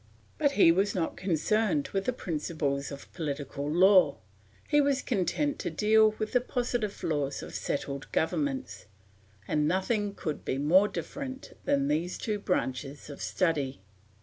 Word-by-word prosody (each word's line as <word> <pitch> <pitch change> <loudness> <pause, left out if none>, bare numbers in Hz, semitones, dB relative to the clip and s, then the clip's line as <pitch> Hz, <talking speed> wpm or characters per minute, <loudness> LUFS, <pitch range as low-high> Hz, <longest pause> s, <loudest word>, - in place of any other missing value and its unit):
But 285 -2 +3
he 170 -8 +6
was 195 +5 +1
not 170 -3 -1
concerned 215 - +1
with 195 0 -2
the - - +2
principles 150 - -2
of 140 0 -10
political 145 -3 -4
law; 180 -2 +5 0.5
he 295 - +4
was 280 -1 +2
content 280 - 0
to - - -2
deal 215 +5 +4
with 215 0 -3
the 250 - +3
positive 240 -5 -2
laws 145 -3 -1
of - - -9
settled 140 -1 -3
governments; 270 - -1 0.6
and 150 -1 +1
nothing 200 +3 0
could 155 -2 -4
be 130 - -2
more 175 +9 +5
different 265 +3 -6
than 140 -1 +2
these 160 +5 -1
two 210 -2 -2
branches 140 -6 -2
of 140 - -9
study. 150 - 0
185 Hz, 150 wpm, -29 LUFS, 150-220 Hz, 0.6 s, he